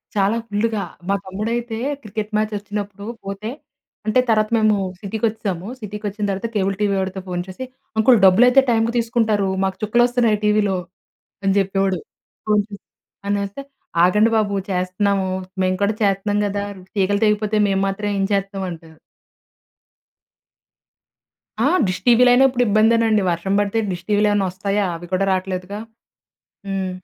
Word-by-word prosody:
చాలా 205 +3 +2
ఫుల్లుగా, 215 0 -1 0.3
మా 200 - +3
తమ్ముడైతే 225 +4 -3 0.3
క్రికెట్ 215 0 -5
మ్యాచ్ 215 0 +1
వచ్చినప్పుడు 205 0 -6 0.2
పోతే, 200 +3 -5 0.6
అంటే 215 +4 +3
తర్వాత 215 -1 +3
మేము 215 -1 +3 0.2
సిటీకి 215 +2 -2
వచ్చేసాము. 205 -4 -4
సిటీకి 210 0 -7
వచ్చిన 205 +1 -5
తర్వాత 195 +4 -2
కేబుల్ 195 -1 +1
టీవీ 200 -1 +2
వాడితో 190 0 -3
ఫోన్ 180 -1 -2
చేసి, 190 +8 -7 0.3
"అంకుల్ 230 +2 +6
డబ్బులైతే 245 +8 +6
టైమ్‌కి 230 0 +2
తీసుకుంటారు. 225 -4 +1
మాకు 190 -1 -1
చుక్కలు 240 +3 +3
వస్తున్నాయి 240 -3 +2
టీవీలో" 210 -2 +2 0.7
అని 195 0 +2
చెప్పేవాడు. 195 -2 0 0.5
ఫోన్ 210 -1 +4
చేస్తే 200 -1 -11 0.4
అనేస్తే, 200 +5 -2 0.4
"ఆగండి 210 +5 +3
బాబు 205 -2 0 0.2
చేస్తున్నాము. 190 +1 0 0.3
మేము 185 0 +1
కూడా 205 +1 +1
చేస్తున్నాం 205 +1 +1
కదా! 200 0 -2 0.3
తీగలు 200 +1 +1
తెగిపోతే 210 0 +1
మేము 195 0 +1
మాత్రం 205 +2 -3
ఏం 195 - +1
చేతాం?" 195 -1 -2
అంటారు. 160 -1 -12 2.6
ఆ! - - +3 0.2
డిష్ 185 - -2
టీవీలైనా 245 +2 +6
ఇప్పుడు 250 -1 +1
ఇబ్బందేనండి. 220 +1 +3
వర్షం 170 +3 -2
బడితే 205 +2 0
డిష్ 175 -1 -6
టీవీలు 210 0 +3
ఏమన్నా 205 -1 +1
ఒస్తాయా? 200 +2 -1
అవి 175 +1 -10
కూడా 190 +2 +2
రావట్లేదుగా. 185 +1 -3 0.9
హ్మ్. 195 -1 -2
205 Hz, 140 wpm, -20 LUFS, 195-215 Hz, 2.6 s, అంకుల్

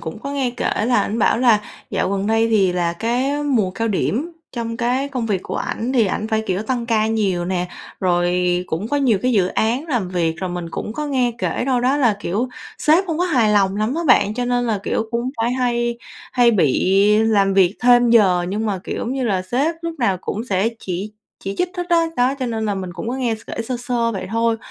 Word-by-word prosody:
cũng 160 +6 -6
có 280 +4 -6
nghe 270 -3 0
kể 240 -3 -1
là 245 - +3
ảnh 220 +3 -2
bảo 220 - +3
là 235 -4 +4 0.3
dạo - - 0
gần 200 0 -1
đây 225 +1 +2
thì 200 -5 +3
là 175 -1 0
cái 255 +9 -1
mùa 235 -10 +1
cao 225 +4 -2
điểm 245 - -1 0.2
trong 230 -2 -4
cái 255 +3 0
công 250 -4 -3
việc 195 -4 -1
của - - -5
ảnh 245 +4 -3
thì 230 -5 +3
ảnh 215 +3 -2
phải, 220 -1 0
kiểu, 190 +2 -1
tăng 240 0 -2
ca 220 -2 +2
nhiều 200 -6 0
nè, 180 0 -2 0.3
rồi 175 -1 +2 0.4
cũng 180 +7 -3
có 290 - 0
nhiều 250 -8 +2
cái 255 - +2
dự 195 -5 +3
án 240 - 0
làm 235 - -1
việc. 170 -3 0
Rồi 185 -1 -4
mình 175 -1 -5
cũng 215 - -5
có 300 +4 -4
nghe 255 -4 +1
kể - - -1
đâu 255 -2 +2
đó 260 +3 +2
là, 240 -7 +2
kiểu, 210 +7 -1 0.3
sếp 325 +5 +4
không 325 -1 -2
có 360 - +2
hài 245 -11 +2
lòng 195 -1 +2
lắm 215 +5 0
á 335 - -1
bạn, 215 -4 +4
cho 245 - -2
nên 245 0 0
là, 220 -3 0
kiểu, 220 - -1
cũng 235 +2 -1
phải 240 +2 +1
hay 240 -2 0 0.3
hay 245 -1 +5
bị 185 - +2 0.3
làm 200 -3 +3
việc 190 0 +3
thêm 245 -1 +5
giờ, 185 -6 +4
nhưng 210 +4 -2
mà, 200 -3 -1
kiểu, - - -4
giống 240 - -3
như 265 -2 -2
là 190 -5 0
sếp 275 - 0
lúc 335 0 -3
nào 200 -7 +1
cũng 220 +4 -4
sẽ 200 -1 +1
chỉ 195 +3 -5 0.3
chỉ 195 - -3
trích 360 - +1
hết 355 0 -3
á, 335 -1 +4
đó, 250 +2 +2
cho 255 - 0
nên 220 -2 -2
là 205 - 0
mình 185 -2 -5
cũng 185 +6 -6
có 250 - -2
nghe 245 -4 0
s - - -10
kể 230 - -4
sơ 250 +2 -3
sơ 240 -1 -1
vậy 195 - -5
thôi. 230 0 +1
230 Hz, 245 wpm, -20 LUFS, 195-250 Hz, 0.4 s, hay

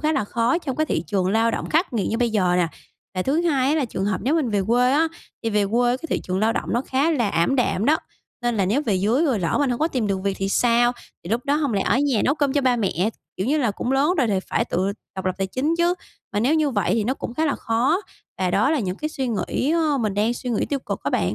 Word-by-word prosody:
khá 310 +1 +1
là 270 -8 0
khó 235 +9 +1
trong 275 -7 -4
cái 310 0 +1
thị 155 - -1
trường 190 0 0
lao 225 +2 +3
động - - -3
khắc 330 -1 +1
nghiệt 215 -5 0
như 225 - -1
bây 240 -2 +1
giờ 185 -5 +2
nè. 175 -2 +3 0.5
Và 185 - 0
thứ 285 - +1
hai 275 -6 +2
á, 300 - +2
là 305 - +1
trường 195 -5 -3
hợp 205 -2 -1
nếu 280 - +2
mình 300 -8 +1
về 205 -2 +1
quê 245 +2 +3
á, 320 +3 +3 0.3
thì 225 - -1
về 210 -1 +2
quê 240 +3 +2
cái 270 - -17
thị - - 0
trường 185 0 -2
lao 220 +3 +2
động - - -3
nó 240 - +2
khá 275 +5 0
là 245 -9 +1
ảm 170 +12 +1
đạm 230 -5 +1
đó, 305 +6 +4 0.5
nên 240 -2 0
là 195 -2 +1
nếu 250 +10 +1
về 220 -9 0
dưới 220 - +2
rồi 260 -8 +1
lỡ 170 -2 0
mình 285 -3 +2
hổng 240 - -1
có 315 - +2
tìm 250 -9 -1
được 195 -1 0
việc 200 0 0
thì 195 0 -1
sao? 240 +3 +3 0.3
Thì 175 - -7
lúc 235 +2 0
đó 285 0 +2
hông 290 -5 0
lẽ 195 - +1
ở 250 - +2
nhà 275 -6 +1
nấu 280 - +3
cơm 285 -3 0
cho 285 - +2
ba 255 -2 +2
mẹ? 200 -1 0 0.3
Kiểu 190 - -2
như 295 +4 +2
là, 245 -7 +1
cũng 245 +6 -3
lớn 290 +6 +3
rồi 255 - +3
thì 200 -4 +1
phải 225 - -1
tự 190 -2 -1 0.2
độc 190 - -4
lập 185 - 0
tài 195 - 0
chính 275 - -1
chứ, 345 +1 +3 0.4
mà 205 - 0
nếu 265 +8 +3
như 310 -2 +2
vậy 200 -6 +1
thì 220 -2 0
nó 255 - 0
cũng 235 - -6
khá 315 - 0
là 285 - +1
khó. 245 - +1 0.4
Và 185 -1 0
đó 270 - +2
là 315 - +2
những 185 -2 -3
cái 305 - -3
suy 270 -4 -3
nghĩ, 240 +5 -1
ơ, 315 -4 +2
mình 215 -4 -1
đang 215 +4 +1
suy 250 +1 -5
nghĩ 230 - 0
tiêu 285 - -1
cực - - -5
á - - -1
bạn. - - 0
240 Hz, 305 wpm, -23 LUFS, 205-285 Hz, 0.5 s, đó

